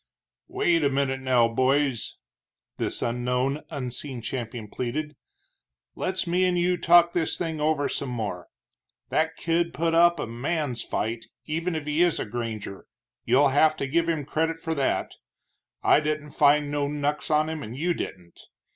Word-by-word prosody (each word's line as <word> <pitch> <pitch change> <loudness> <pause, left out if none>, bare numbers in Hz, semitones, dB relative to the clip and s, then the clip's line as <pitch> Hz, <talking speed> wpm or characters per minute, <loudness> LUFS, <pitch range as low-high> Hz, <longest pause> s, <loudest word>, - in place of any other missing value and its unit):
"Wait 165 -2 +1
a 140 - +4
minute 135 -1 0
now, 130 -3 +3
boys," 130 0 +1 0.6
this - - -1
unknown, 125 +4 0
unseen 130 0 -4
champion 115 -1 -5
pleaded, 150 +8 -4 0.8
"let's 185 0 -2
me 180 +2 +1
and 180 -1 +2
you 180 +1 +2
talk 170 0 +5
this 165 -3 0
thing 160 -3 -3
over 150 -2 +1
some 140 - -3
more. 105 -7 -4 0.6
That - - +1
kid 170 0 0
put 165 0 0
up 170 +1 +5
a - - -1
man's 125 +1 -2
fight, 115 +2 -3 0.2
even 165 +3 -2
if 155 -2 -3
he 150 +2 0
is 175 -2 +3
a - - -2
granger 110 -3 -5 0.4
you'll 140 +2 +4
have 155 +3 +4
to - - -2
give 165 +4 +1
him 155 -4 -1
credit 160 +3 -1
for 165 0 -3
that. 140 -4 0 0.7
I - - +6
didn't 150 -1 -3
find 145 0 +3
no 145 -1 0
knucks 145 +1 -2
on 155 0 +3
him, 160 -1 -4
and 120 0 -7
you 175 +4 +1
didn't. 90 - -7
145 Hz, 165 wpm, -26 LUFS, 125-165 Hz, 0.8 s, I